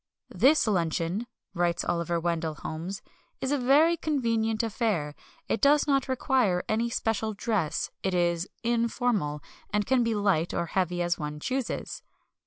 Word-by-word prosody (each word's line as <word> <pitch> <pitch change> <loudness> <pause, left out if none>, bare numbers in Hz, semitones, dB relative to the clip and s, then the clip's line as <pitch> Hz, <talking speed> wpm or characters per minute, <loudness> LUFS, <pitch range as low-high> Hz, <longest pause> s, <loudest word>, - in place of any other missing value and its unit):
"This 300 +4 +4
luncheon," 175 +2 0 0.3
writes 175 -2 0
Oliver 170 0 0
Wendell 165 -2 -1
Holmes, 170 +7 -6 0.4
"is 265 +1 -2
a 290 - +2
very 290 +7 +5
convenient 230 -8 0
affair; 215 - -1 0.3
it 220 - -1
does 290 +1 +5
not 275 -2 +1
require 255 -8 +1
any 230 +2 0
special 220 -2 -1
dress; 185 -6 -1
it 190 -1 -1
is 175 +1 +1
informal; 230 -9 0 0.3
and 210 0 0
can 260 +1 +3
be 230 -1 0
light 195 -5 +1
or 170 - 0
heavy 175 0 0
as 175 0 0
one 150 0 -4
chooses." 260 - -3
210 Hz, 145 wpm, -28 LUFS, 170-240 Hz, 0.4 s, very